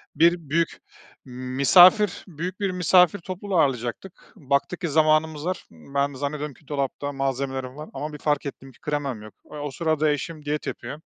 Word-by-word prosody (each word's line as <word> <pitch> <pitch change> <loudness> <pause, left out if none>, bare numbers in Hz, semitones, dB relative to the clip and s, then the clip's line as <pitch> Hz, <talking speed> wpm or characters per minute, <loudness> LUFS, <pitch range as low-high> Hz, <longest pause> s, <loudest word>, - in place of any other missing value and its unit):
Bir 170 +2 +5
büyük 165 +2 0 0.5
misafir, 140 - +5
büyük 180 +3 -5
bir 195 -2 0
misafir 180 +1 +4
topluluğu 185 +2 -3
ağırlayacaktık. 130 +6 -2
Baktık 140 +5 -1
ki 170 - -1
zamanımız 155 0 +2
var, 185 0 -3
ben 140 - -2
zannediyorum 145 +1 -4
ki 150 - -24
dolapta 145 0 -2
malzemelerim 135 -1 -3
var 150 +1 -8
ama 150 +1 -5
bir - - -6
fark 145 -1 0
ettim 135 -1 -7
ki - - -24
kremam 140 -7 -3
yok. 110 -1 -12 0.2
E, - - -8
o 145 -1 -4
sırada 155 0 +1
eşim 150 +1 -4
diyet 150 +1 -2
yapıyor. 150 - -6
150 Hz, 165 wpm, -24 LUFS, 135-170 Hz, 0.5 s, Bir